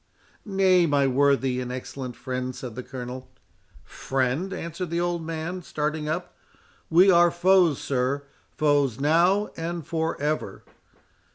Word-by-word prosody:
"Nay, 190 -3 +4
my 145 -2 +2
worthy 135 -1 +2
and 125 0 -5
excellent 130 0 -6
friend," 125 +1 -4
said 125 -3 -7
the 125 - -6
Colonel— 125 0 -8 0.5
"Friend!" 135 +8 -2
answered 170 -1 -5
the 170 +1 -1
old 175 -1 -1
man, 165 +3 -4
starting 150 -1 -3
up—"We 175 +2 0
are 175 -1 +6
foes, 175 -3 +3
sir—foes 140 0 -1
now, 175 +8 +3
and 165 -1 -4
for 165 0 -2
ever!" 150 +2 -2
155 Hz, 120 wpm, -25 LUFS, 130-175 Hz, 0.5 s, are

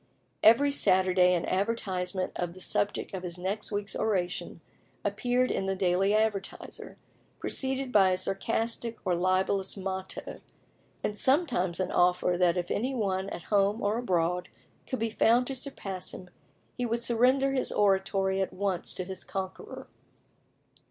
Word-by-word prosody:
Every 275 +6 +6
Saturday 185 -6 +4
an 170 - -1
advertisement 185 -2 -1
of 175 -1 -3
the - - -11
subject 205 +2 -1
of 190 - -4
his 180 -1 -5
next 195 +5 -3
week's 205 0 -2
oration 185 -5 -2 0.5
appeared 250 0 +1
in 195 - -1
the 195 - 0
Daily 190 +2 +2
Advertiser, 215 -3 -3 0.4
preceded 265 -1 -1
by 195 -4 +5
a 185 - +1
sarcastic 225 +5 -1
or 180 - +2
libellous 185 +2 0
motto, 190 0 -5 0.6
and 210 - -1
sometimes 250 - +2
an 185 - -1
offer 180 0 +3
that 175 0 +2
if 175 -1 -2
any 255 +5 -1
one 195 -4 -1
at 175 - -7
home 205 +2 +2
or 210 +3 +1
abroad 180 -5 0 0.4
could 260 - -2
be 225 -1 -1
found 235 +3 +3
to 270 - -4
surpass 200 -9 -4
him, 180 -1 -11 0.4
he 250 - -3
would 235 0 -1
surrender 255 +4 +3
his 260 - 0
Oratory 195 -1 +1
at 190 - -1
once 190 -2 -1
to 185 - -2
his 190 0 -6
conqueror. 190 -1 -6
195 Hz, 150 wpm, -29 LUFS, 185-230 Hz, 0.6 s, Every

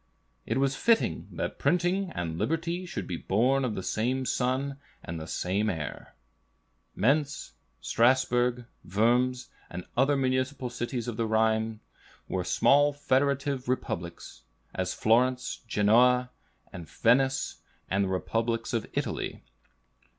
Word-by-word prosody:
"It 115 - 0
was 135 0 +1
fitting 230 +9 +1
that - - -4
printing 180 +2 +1
and 85 -2 -3
liberty 170 +3 -1
should 100 - -4
be 85 - -4
born 125 +10 +2
of 120 -4 -1
the 95 - -4
same 130 +7 -1
sun 135 +3 -1 0.2
and 85 0 -5
the 80 - -7
same 100 +6 -1
air." 80 -6 -5 0.8
Mentz, 140 +4 +1 0.3
Strasbourg, 125 0 +2 0.2
Worms, 125 +6 +1 0.2
and 90 0 -7
other 135 +3 +3
municipal 130 -1 -1
cities 120 -1 -3
of 115 -3 -4
the 115 - 0
Rhine, 110 0 +1 0.5
were - - -2
small 145 +1 +4
federative 140 -1 0
republics; 85 - -4 0.3
as 90 -1 -2
Florence, 125 +3 +2
Genoa, 125 +4 +4 0.4
Venice, 130 +10 +1 0.3
and 100 +1 +1
the - - -3
republics 115 +4 -1
of 115 -2 -1
Italy. - - -3
125 Hz, 120 wpm, -28 LUFS, 110-135 Hz, 0.8 s, small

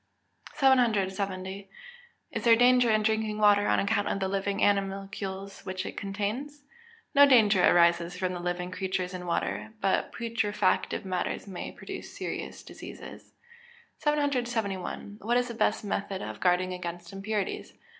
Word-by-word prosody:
770. 200 -7 +1 0.6
Is - - -4
there 230 -1 +7
danger 245 0 +5
in 215 -1 +3
drinking 220 -1 0
water 205 -1 +5
on - - +3
account 205 0 +1
of - - -1
the 190 - 0
living 195 +1 -1
animalcules 195 0 -2
which 185 +1 -4
it - - -6
contains? 215 +9 -4 0.5
No 285 -1 +8
danger 215 -8 +5
arises 170 +1 +4
from 185 -1 -1
the 175 - -4
living 175 +1 -3
creatures 185 -1 -2
in 180 -1 -6
water; 220 +5 -2
but 195 - +1
putrefactive 225 -4 0
matters 185 -1 -2
may 190 -3 -6
produce - - -9
serious - - -5
diseases. - - -11 0.7
771. 240 -9 -1
_What 235 +4 +1
is 245 0 0
the - - -4
best 225 - +1
method 200 -1 -3
of - - -6
guarding 185 0 +2
against 175 0 -6
impurities? 200 +1 -3
200 Hz, 140 wpm, -28 LUFS, 185-225 Hz, 0.7 s, No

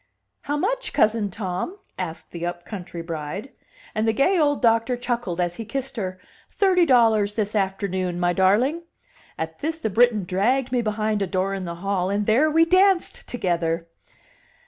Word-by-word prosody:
"How 290 +1 -2
much, - - -1
cousin 215 -1 +2
Tom?" 190 - -4 0.2
asked 170 -3 -6
the 170 -1 -6
upcountry 175 0 -6
bride. 165 - -5 0.4
And 215 +1 0
the 225 - +3
gay 350 - +3
old 290 -2 +2
doctor 230 +1 +2
chuckled, 240 -7 -3
as 175 -1 -1
he 230 - -4
kissed 265 +4 -4
her: 185 -4 -4 0.3
"Thirty 365 -4 +3
dollars 220 -5 +4
this 210 -2 -1
afternoon, 190 -3 -1
my 175 0 +2
darling." 220 - +2 0.6
At 160 0 -5
this 320 +2 -2
the 220 -9 -3
Briton 225 -1 +3
dragged 240 +9 +1
me 250 -1 +2
behind 215 -1 -1
a 195 - 0
door 190 +1 -1
in 190 -1 -4
the 170 0 -5
hall, 190 -2 0
and 205 +1 0
there 255 +9 +4
we 325 +2 +4
danced 370 +1 +3
together. 170 -6 -1
210 Hz, 170 wpm, -23 LUFS, 185-255 Hz, 0.6 s, dollars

